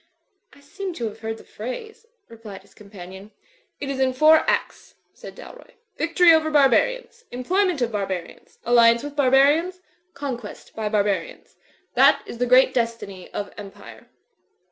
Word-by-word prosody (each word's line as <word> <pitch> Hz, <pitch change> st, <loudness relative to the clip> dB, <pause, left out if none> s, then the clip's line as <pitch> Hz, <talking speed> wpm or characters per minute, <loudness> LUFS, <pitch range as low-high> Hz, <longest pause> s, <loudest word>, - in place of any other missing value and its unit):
"I 285 Hz, -, -20 dB
seem 370 Hz, +6 st, -7 dB
to 240 Hz, -, -4 dB
have 215 Hz, 0 st, -7 dB
heard 225 Hz, 0 st, -5 dB
the -, -, -15 dB
phrase/' 440 Hz, -, -9 dB, 0.2 s
replied 215 Hz, -4 st, -12 dB
his -, -, -24 dB
com 205 Hz, -1 st, -17 dB
panion. 190 Hz, +1 st, -11 dB, 0.5 s
"It 285 Hz, -, -5 dB
is 275 Hz, -1 st, -4 dB
in 260 Hz, -1 st, +1 dB
four 310 Hz, +4 st, +6 dB
acts," -, -, -3 dB, 0.2 s
said -, -, -12 dB
Dalroy. -, -, -14 dB, 0.2 s
"Victory 335 Hz, 0 st, +4 dB
over 315 Hz, -1 st, +2 dB
barbarians. 465 Hz, -, +1 dB
Employment 350 Hz, +4 st, 0 dB
of 235 Hz, -, -2 dB
barbarians. 195 Hz, -4 st, -6 dB
Alliance; 235 Hz, 0 st, +4 dB
with 290 Hz, 0 st, -7 dB
barbarians. 290 Hz, +7 st, +3 dB, 0.4 s
Conquest 245 Hz, -6 st, -7 dB
by 220 Hz, -1 st, -3 dB
barbarians. 210 Hz, -, -2 dB, 0.4 s
That -, -, +4 dB
is 235 Hz, -, -9 dB
the 245 Hz, -, 0 dB
great 255 Hz, +1 st, +5 dB
destiny 230 Hz, -6 st, -4 dB
of 200 Hz, -, -5 dB
Empire." 200 Hz, -1 st, -13 dB
255 Hz, 150 wpm, -22 LUFS, 215-315 Hz, 0.5 s, four